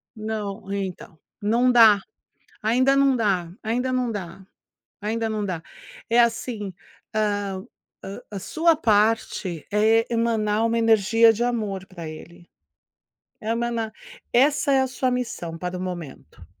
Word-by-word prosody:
Não 210 Hz, -3 st, -5 dB
então, 190 Hz, -5 st, -5 dB, 0.2 s
não 235 Hz, +5 st, +3 dB
dá, 225 Hz, -4 st, +7 dB, 0.6 s
ainda 255 Hz, +5 st, +3 dB
não 275 Hz, -1 st, +4 dB
dá, 190 Hz, -7 st, 0 dB
ainda 250 Hz, +4 st, -1 dB
não 250 Hz, -2 st, 0 dB
dá, 190 Hz, -2 st, -7 dB, 0.6 s
ainda 225 Hz, +2 st, -1 dB
não 215 Hz, -1 st, -2 dB
dá, 180 Hz, -4 st, -3 dB, 0.5 s
é 235 Hz, +1 st, +4 dB
assim, 225 Hz, -4 st, 0 dB, 0.4 s
ah, 205 Hz, -3 st, -1 dB, 0.4 s
a 195 Hz, +1 st, -7 dB
a -, -, -2 dB
sua 325 Hz, -, +2 dB
parte 210 Hz, -, +1 dB
é 220 Hz, +2 st, +4 dB
emanar 225 Hz, -2 st, +1 dB
uma 230 Hz, 0 st, +1 dB
energia 225 Hz, 0 st, +5 dB
de 230 Hz, +2 st, -3 dB
amor 210 Hz, -6 st, -2 dB
pra 170 Hz, -4 st, -8 dB
ele, 170 Hz, +2 st, -12 dB, 0.9 s
emana 230 Hz, 0 st, -2 dB, 0.4 s
essa 280 Hz, +3 st, +3 dB
é 270 Hz, -, +4 dB
a 265 Hz, -, +2 dB
sua 255 Hz, 0 st, -1 dB
missão 175 Hz, -10 st, -3 dB
para 180 Hz, +1 st, -4 dB
o -, -, -5 dB
momento. 175 Hz, -, -8 dB
220 Hz, 135 wpm, -24 LUFS, 195-235 Hz, 0.9 s, dá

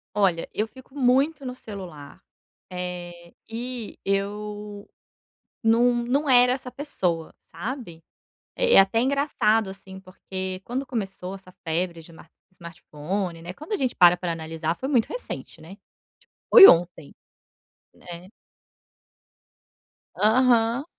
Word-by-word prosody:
Olha, 190 Hz, -5 st, +1 dB
eu 215 Hz, -, -1 dB
fico 260 Hz, +2 st, -17 dB
muito 275 Hz, +3 st, +2 dB
no 250 Hz, -, -5 dB
celular, 190 Hz, -, -10 dB, 0.5 s
eh, 175 Hz, -1 st, -7 dB, 0.2 s
e 235 Hz, 0 st, -6 dB
eu 205 Hz, +1 st, -4 dB, 0.8 s
nu 235 Hz, +2 st, +3 dB
não 280 Hz, +4 st, 0 dB
era 250 Hz, -1 st, +6 dB
essa 255 Hz, -1 st, -7 dB
pessoa, 180 Hz, -, -3 dB
sabe. 200 Hz, -, -7 dB, 0.5 s
Eh, -, -, +2 dB
é -, -, +10 dB
até 195 Hz, +4 st, +3 dB
engraçado, 245 Hz, -6 st, +1 dB
assim, 190 Hz, 0 st, -12 dB
porque 185 Hz, 0 st, -7 dB
quando 260 Hz, +5 st, -4 dB
começou 195 Hz, -6 st, -5 dB
essa 190 Hz, -1 st, -12 dB
febre 170 Hz, +1 st, -2 dB
de 170 Hz, -, -15 dB
smar 165 Hz, 0 st, -16 dB, 0.2 s
smartphone, 170 Hz, +1 st, -6 dB
né, 175 Hz, +2 st, -8 dB
quando 310 Hz, -, -12 dB
a -, -, +3 dB
gente 260 Hz, -9 st, -2 dB
para 175 Hz, -1 st, +7 dB
para 175 Hz, -1 st, -4 dB
analisar 160 Hz, 0 st, -4 dB
foi 265 Hz, -, -5 dB
muito 250 Hz, -6 st, +2 dB
recente, -, -, -8 dB
né. 160 Hz, -, -13 dB
Tipo -, -, -46 dB, 0.7 s
foi 425 Hz, -5 st, +12 dB
ontem, 170 Hz, -3 st, +2 dB, 0.8 s
né. 175 Hz, +1 st, -11 dB, 1.9 s
Aham. 235 Hz, +2 st, +3 dB
200 Hz, 125 wpm, -24 LUFS, 175-250 Hz, 1.9 s, foi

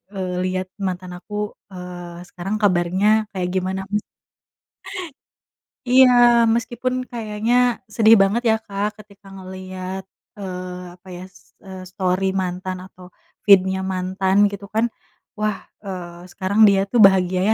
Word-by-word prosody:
eee, 185 Hz, -1 st, -3 dB
liat 185 Hz, 0 st, -2 dB
mantan 185 Hz, -2 st, -4 dB
aku, 210 Hz, +3 st, -5 dB, 0.2 s
eee, 175 Hz, -1 st, -8 dB
sekarang 195 Hz, +4 st, -4 dB
kabarnya 200 Hz, +3 st, +2 dB
kayak 180 Hz, -1 st, -1 dB
gimana." 190 Hz, +1 st, -1 dB, 2.1 s
Iya, 255 Hz, +1 st, +7 dB, 0.4 s
meskipun 240 Hz, +2 st, -2 dB, 0.2 s
kayaknya 220 Hz, 0 st, -2 dB, 0.4 s
sedih 225 Hz, 0 st, +7 dB
banget 205 Hz, +5 st, +1 dB
ya 220 Hz, -, +4 dB
Kak 205 Hz, +1 st, -2 dB
ketika 200 Hz, -1 st, -21 dB
ngeliat, 185 Hz, 0 st, -7 dB, 0.3 s
eee, 180 Hz, -2 st, -7 dB
apa 185 Hz, +1 st, -19 dB
ya 180 Hz, -, -8 dB
s 185 Hz, -, -22 dB
eee, 190 Hz, -1 st, -8 dB
story 185 Hz, 0 st, 0 dB, 0.2 s
mantan 185 Hz, +1 st, -4 dB
atau 180 Hz, -1 st, -15 dB, 0.4 s
feed-nya 190 Hz, -1 st, +5 dB
mantan 190 Hz, +1 st, -1 dB, 0.2 s
gitu 200 Hz, 0 st, -7 dB
kan 225 Hz, +2 st, +3 dB, 0.5 s
wah, 215 Hz, -1 st, -1 dB, 0.3 s
eee, 175 Hz, -2 st, -8 dB
sekarang 195 Hz, +3 st, -1 dB
dia 195 Hz, -1 st, +4 dB
tuh 240 Hz, -, +3 dB
bahagia 185 Hz, -1 st, +2 dB
190 Hz, 125 wpm, -21 LUFS, 185-205 Hz, 2.1 s, Iya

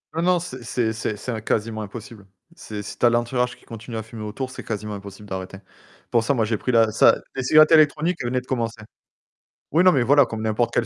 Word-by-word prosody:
Non, 165 Hz, -, 0 dB
non, 180 Hz, 0 st, +3 dB
c'est 130 Hz, -7 st, -7 dB, 0.3 s
c'est 110 Hz, -2 st, -3 dB
c'est 125 Hz, -, -5 dB
im 110 Hz, -, -4 dB
quasiment 110 Hz, 0 st, -2 dB
impossible. 110 Hz, 0 st, -9 dB, 0.3 s
C'est 105 Hz, -8 st, -7 dB
si -, -, -9 dB
tu -, -, +3 dB
as 120 Hz, -, +7 dB
l'entourage 125 Hz, +1 st, 0 dB
qui -, -, -24 dB
continue 115 Hz, +1 st, -8 dB
à 110 Hz, -, -4 dB
fumer 115 Hz, 0 st, -10 dB
autour, 130 Hz, +5 st, -5 dB
c'est -, -, -8 dB
quasiment 105 Hz, -1 st, -4 dB
impossible 100 Hz, +1 st, -10 dB
d'arrêter. 95 Hz, 0 st, -6 dB, 0.5 s
Pour 115 Hz, -1 st, +3 dB
ça, 140 Hz, +4 st, +1 dB
moi, 110 Hz, -2 st, +1 dB
j'ai 110 Hz, 0 st, -1 dB
pris 125 Hz, -, -2 dB
la 115 Hz, -2 st, +4 dB
ça 110 Hz, -, +5 dB, 0.2 s
les 135 Hz, -, -2 dB
cigarettes 155 Hz, +5 st, +5 dB
électroniques 155 Hz, 0 st, +3 dB
venaient 125 Hz, +1 st, 0 dB
de 125 Hz, -, -20 dB
commencer. 115 Hz, -4 st, -3 dB, 0.9 s
Oui, 170 Hz, +5 st, +3 dB
non, 185 Hz, -, +7 dB
mais 130 Hz, -4 st, +2 dB
voilà, 140 Hz, +2 st, +5 dB
comme 110 Hz, -2 st, -6 dB
n'importe 110 Hz, +2 st, 0 dB
quelle 115 Hz, -, +1 dB
115 Hz, 230 wpm, -23 LUFS, 110-130 Hz, 0.9 s, as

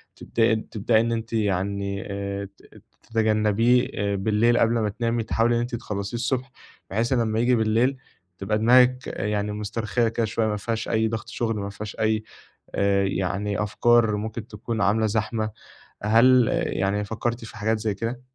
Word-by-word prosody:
تبدأ 115 Hz, 0 st, +1 dB, 0.2 s
تبدئي 110 Hz, +1 st, +2 dB
إن 115 Hz, 0 st, -1 dB
أنتِ 115 Hz, 0 st, -3 dB
يعني 100 Hz, -1 st, -1 dB
آآ، 100 Hz, 0 st, -4 dB
تت -, -, -19 dB, 0.3 s
تتجنبيه 110 Hz, +2 st, +2 dB, 0.3 s
بالليل 110 Hz, +4 st, +2 dB
قبل 115 Hz, 0 st, +3 dB
ما 105 Hz, -1 st, 0 dB
تنامي، 115 Hz, +2 st, -1 dB
تحاولي 115 Hz, +2 st, +1 dB
إن -, -, +1 dB
أنتِ 120 Hz, 0 st, -3 dB
تخلصيه 105 Hz, -1 st, -4 dB
الصبح 130 Hz, +2 st, -2 dB, 0.4 s
بحيث 115 Hz, +6 st, 0 dB
لمّا 115 Hz, -3 st, +1 dB
ييجي 120 Hz, +2 st, +3 dB
بالليل 115 Hz, +4 st, +2 dB, 0.4 s
تبقى 105 Hz, +3 st, -1 dB
دماغِك 125 Hz, +3 st, +4 dB
يعني 105 Hz, 0 st, -2 dB
مسترخية 105 Hz, +2 st, -1 dB
كده 115 Hz, 0 st, 0 dB
شوية، 110 Hz, +1 st, -1 dB
ما 105 Hz, -1 st, -1 dB
فيهاش 110 Hz, +2 st, -3 dB
أي 110 Hz, -1 st, +2 dB
ضغط 110 Hz, 0 st, -4 dB
شغل، 115 Hz, -2 st, -2 dB
ما 100 Hz, 0 st, -4 dB
فيهاش 105 Hz, +1 st, -7 dB
أي 110 Hz, 0 st, +1 dB, 0.5 s
آآ، 100 Hz, 0 st, +2 dB
يعني 100 Hz, +2 st, -1 dB
أفكار 115 Hz, +1 st, +3 dB
ممكن 110 Hz, +1 st, -5 dB
تكون 115 Hz, 0 st, -5 dB
عاملة 105 Hz, +2 st, +2 dB
زحمة، 110 Hz, +1 st, -1 dB, 0.5 s
هل 115 Hz, +3 st, +5 dB
يعني 100 Hz, +2 st, 0 dB
فكرتِ 115 Hz, +2 st, -3 dB
في 105 Hz, -, -11 dB
حاجات 110 Hz, +1 st, 0 dB
زي 110 Hz, -1 st, -1 dB
كده؟ 115 Hz, +4 st, -4 dB
110 Hz, 160 wpm, -24 LUFS, 105-115 Hz, 0.5 s, هل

